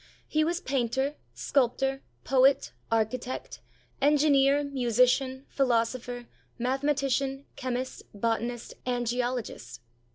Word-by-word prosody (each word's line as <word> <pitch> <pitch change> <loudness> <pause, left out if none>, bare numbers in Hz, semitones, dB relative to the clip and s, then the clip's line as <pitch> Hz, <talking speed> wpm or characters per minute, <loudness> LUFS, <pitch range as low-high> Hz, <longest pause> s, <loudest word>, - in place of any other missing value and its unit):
He 310 0 +2
was 345 +2 -1
painter, 265 +1 0 0.2
sculptor, 270 +1 +1 0.2
poet, 265 - +4 0.2
architect, 225 +3 -1 0.4
en 295 +2 +5
gineer, 280 -1 +4
musician, 260 0 +2
philosopher, 245 -1 0 0.3
mathematician, 270 +1 0
chemist, 255 0 -3
botanist, 230 +2 -2
and 245 -1 -1
geologist. 240 - -3
255 Hz, 90 wpm, -28 LUFS, 240-275 Hz, 0.4 s, en